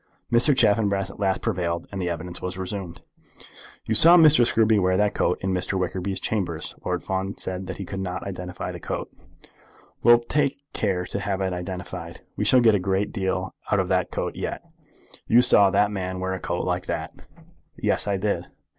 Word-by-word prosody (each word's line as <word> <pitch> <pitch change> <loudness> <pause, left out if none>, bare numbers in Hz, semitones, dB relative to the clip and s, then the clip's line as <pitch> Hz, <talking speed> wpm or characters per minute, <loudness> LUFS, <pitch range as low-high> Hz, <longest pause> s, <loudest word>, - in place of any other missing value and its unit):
Mr. 130 +4 +4
Chaffanbrass 100 -4 +2
at - - -15
last 95 -2 0
prevailed, 85 -1 -1
and 100 -1 -4
the 90 - -1
evidence 85 +1 -5
was 90 0 -4
resumed. 95 -2 -6 0.8
"You 110 - -1
saw 165 +11 +8
Mr. 155 -6 +7
Scruby 110 -2 +3
wear 95 0 +2
that 105 0 +2
coat 90 - +1
in 95 0 -1
Mr. 95 +1 -1
Wickerby's 95 +1 -2
chambers." 90 -7 -2
Lord - - -2
Fawn 95 +1 -3
said 95 0 -5
that - - -6
he 100 - -6
could 95 +2 -6
not 95 -1 -4
identify 90 -2 -6
the - - -8
coat. - - -5 0.9
"We'll 120 +1 +7
take 140 +4 -1
care 95 -4 -1
to 100 - -4
have 100 -1 -2
it 95 -1 -1
identified. 90 0 -6
We - - -2
shall 130 - +5
get 115 -2 +5
a 100 - +2
great 95 +2 -1
deal 95 -2 -2 0.2
out 105 - +3
of 95 -1 -1
that 90 -1 +1
coat - - -3
yet. - - -4 0.6
You 120 +2 +5
saw 100 -5 +6
that 100 +2 +2
man 95 -2 -4
wear 95 0 -2
a 95 - -4
coat - - -3
like - - -2
that." - - -3 0.7
"Yes; - - 0
I 100 -1 +1
did." 100 +2 -2
95 Hz, 195 wpm, -24 LUFS, 90-105 Hz, 0.9 s, saw